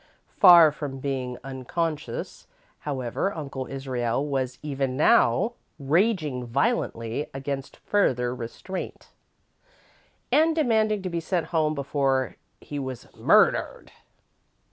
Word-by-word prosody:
Far 170 -5 +9
from 145 -2 -6
being 130 -2 -3
unconscious, 145 +4 -4 0.3
however, 135 +5 -2
Uncle 135 -4 -5
Israel 130 -1 -2
was 130 -3 -2
even 135 -3 -2
now 145 - +4 0.2
raging 155 - +1
violently 130 - -1
against 135 0 -5
further 125 - +1
restraint, 125 +10 -7 1.2
and 320 +1 +4
demanding 220 -8 +1
to 185 - -2
be 170 - -1
sent 170 +1 -2
home 155 -1 +2
before 135 -2 0 0.2
he 145 - -6
was 130 -3 -7
"murdered." - - +2
140 Hz, 100 wpm, -25 LUFS, 130-170 Hz, 1.2 s, Far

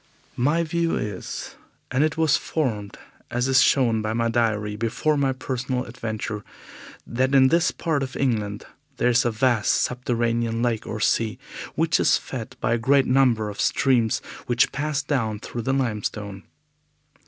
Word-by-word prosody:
My 155 +6 +2
view 170 +1 0
is 105 -3 -5 0.4
and 130 +3 +2
it 155 +1 0
was 160 -3 +4
formed, 110 -10 -2 0.3
as 125 +2 0
is 130 -1 +5
shown 115 -5 +3
by 110 0 -2
my 115 0 0
diary, 110 -3 0
before 115 +8 0
my 140 -2 +1
personal 130 -1 -3
adventure 110 -3 -5 0.6
that 130 +3 0
in 130 -1 +6
this 170 +3 +3
part 160 -4 -1
of 135 -1 -4
England 105 -6 -1 0.3
there 120 - +2
is 125 +1 +3
a - - +3
vast 115 -1 +2
subterranean 115 -2 0
lake 115 -3 -1
or 110 - -4
sea, 110 +1 +1 0.4
which 165 0 +2
is - - +4
fed 120 -4 -7
by - - 0
the 120 - +3
great 135 +3 +3
number 125 -4 +3
of 100 - -5
streams 120 -5 +2 0.2
which 120 0 +2
pass 145 0 -2
down 115 -7 -1
through 120 - -6
the 130 - -1
limestone. 105 -5 -3
120 Hz, 160 wpm, -24 LUFS, 110-135 Hz, 0.6 s, in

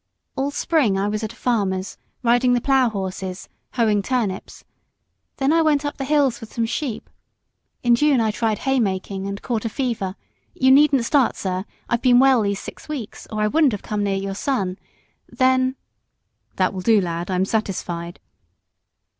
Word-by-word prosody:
All 275 +1 -1
spring 285 - +1
I 195 +1 0
was 210 +1 -2
at 220 - -3
a - - -15
farmer's, 195 -6 -1 0.2
riding 245 +1 +3
the 245 - +3
plough 265 -1 +3
horses, 190 -2 -5 0.3
hoeing 215 -4 +2
turnips; 215 -5 -3 0.7
then 275 +3 +2
I 330 - +4
went 300 -2 +2
up 290 - -3
the 270 - -3
hills 275 -4 +2
with 225 - -10
some 230 - -1
sheep: 245 0 -4 0.8
in 240 -1 +4
June 280 +2 +3
I 220 -1 +2
tried 220 0 -1
hay 270 0 0
making, 195 -2 -2
and 200 0 -6
caught 230 -4 -2
a 230 - -2
fever 225 -7 -2 0.4
you 260 0 +4
needn't 275 -3 +5
start, 275 -2 +2
sir, 185 0 -3 0.2
I've 235 0 0
been 250 -2 +5
well 265 -2 +5
these 200 -1 -1
six - - -10
weeks, 265 -9 -6
or 215 -1 -2
I 210 - +3
wouldn't 295 +1 +3
have 205 - -5
come 210 -1 -2
near 200 -1 0
your 195 0 -3
son 195 -5 -2 0.5
then 260 0 +2 0.4
" - - -48
"That 185 0 +1
will 185 - -4
do, 220 +2 +4
lad 170 -1 -3
I'm 185 0 +1
satisfied." 175 -5 -3
225 Hz, 180 wpm, -22 LUFS, 195-260 Hz, 0.8 s, needn't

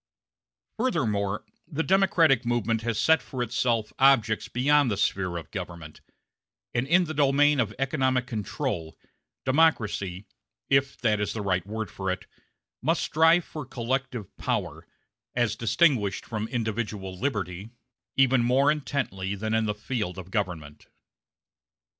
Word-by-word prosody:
Furthermore, 105 - 0 0.2
the 160 +3 -2
democratic 180 - +4
movement 115 -2 0
has 115 -1 -2
set 160 +7 +4
for 130 -3 -4
itself 115 -2 0
objects 120 -5 +4
beyond 145 +2 +3
the 100 - -1
sphere 90 -3 0
of 85 - -9
government; 85 -5 -7 0.7
and 120 +2 0
in 180 +4 +5
the 155 - -5
domain 145 0 +3
of 110 -5 +1
economic 130 -2 +1
control, 90 -8 -4 0.5
democracy 110 - +1 0.5
if 135 0 +2
that 110 -3 +2
is 105 - -1
the 110 - -4
right 95 -1 0
word 110 +1 -4
for 95 0 -4
it 95 +1 -3 0.6
must - - +1
strive 165 +2 +4
for 155 - -7
collective 130 -3 -3
power, - - -3 0.5
as 120 -2 +1
distinguished 115 - +2
from 110 -1 -3
individual 110 -5 -3
liberty, 100 - -3 0.5
even 130 -2 +4
more 130 +4 +4
intently 135 -10 -2
than 110 +2 -3
in 110 -1 +2
the 105 - -1
field 105 -4 -3
of 95 0 -9
government. 80 -8 -4
115 Hz, 135 wpm, -27 LUFS, 100-135 Hz, 0.7 s, in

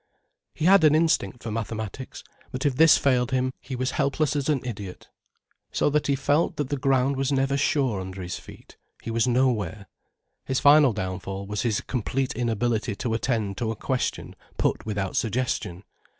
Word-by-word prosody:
He 155 - -2
had 190 -1 +6
an 155 -1 +6
instinct 155 - +1
for 115 - -4
mathematics, 110 +3 -5 0.3
but 130 +2 -4
if 140 -3 +2
this 160 +3 +7
failed 125 -3 +2
him, 130 -1 0
he 130 - -6
was 130 +1 -1
helpless 145 +1 0
as 145 0 -1
an 145 -4 +1
idiot. 100 -6 -7 0.6
So - - +1
that 150 0 +1
he 140 - +2
felt 145 +4 +1
that 145 -3 -3
the 145 - -1
ground 135 0 +1
was 135 +1 0
never 135 0 +1
sure 135 -7 +1
under 95 0 -7
his 90 0 -5
feet, - - -15 0.3
he 115 - -4
was 115 +2 +1
nowhere. 110 -6 0 0.6
His 130 -1 -1
final 145 -3 +6
downfall 95 0 -4
was 105 +1 -3
his 115 -4 0
complete 130 +2 -2
inability 115 -2 -1
to 115 +2 -3
attend 110 -4 -1
to 115 -3 -1
a 110 - -2
question 130 +4 -3 0.2
put - - -1
without 100 -3 -2
suggestion. 110 -6 -2
125 Hz, 180 wpm, -25 LUFS, 110-140 Hz, 0.6 s, this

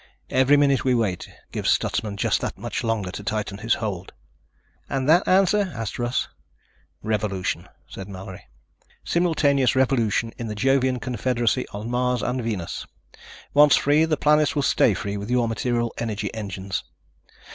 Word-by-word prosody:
Every 130 +2 +4
minute 140 -2 +3
we 130 -1 +2
wait 105 -7 -1 0.2
gives - - -1
Stutsman 105 -2 0
just - - +1
that - - -4
much - - -4
longer 110 -5 -1
to 100 - -7
tighten 105 -1 -3
his 115 +2 +1
hold." 95 -5 -5 0.8
"And 135 -1 -1
that 170 +4 +4
answer?" 195 +1 +3
asked 115 0 -5
Russ. 120 +1 -1 0.8
"Revolution," 105 -4 -2 0.2
said 95 0 -9
Mallory. 95 -1 -9 0.6
"Simultaneous 145 -7 +2
revolution 115 -4 +1
in 120 - -4
the 105 - -4
Jovian 130 +2 +2
confederacy, 120 -3 0
on 105 +3 -6
Mars 125 0 0
and 125 +1 -1
Venus. 105 -8 -4 0.7
Once 145 0 +7
free, 150 +3 +3
the 155 -2 0
planets 150 0 +3
will 145 - +1
stay 110 -5 +3
free 100 0 -4
with 100 +2 -6
your 125 -1 +2
material 120 +1 -1
energy 110 -3 -3
engines. 100 -3 -4
120 Hz, 150 wpm, -24 LUFS, 105-135 Hz, 0.8 s, Once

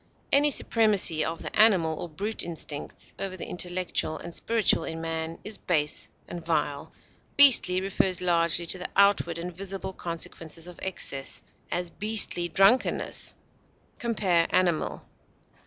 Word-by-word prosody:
Any 290 +1 +5
supremacy 210 - +2
of 165 +1 -4
the - - -6
animal 180 -8 +4
or 175 - -6
brute 205 +8 -3
instincts 155 -3 -4
over 190 -1 -4
the - - -5
intellectual 180 -3 -2
and 170 - -9
spiritual 225 -6 +1
in 160 0 -5
man 165 0 -4
is 210 -1 -5
base 150 -4 +1 0.2
and 170 -1 -7
vile. 150 -3 -2 0.5
Beastly 240 -10 +7
refers 190 -1 0
largely 170 -1 +2
to 180 +2 +2
the 180 - -5
outward 200 -4 +3
and 175 +1 -6
visible 195 0 -5
consequences 165 -1 -5
of 180 -1 -10
excess; 140 -7 -3 0.3
as, 175 -1 -2
beastly 210 -4 0
drunkenness. 195 +10 +2 0.6
Compare 190 -8 +1
ANIMAL. 175 -3 0
175 Hz, 135 wpm, -26 LUFS, 165-195 Hz, 0.6 s, Beastly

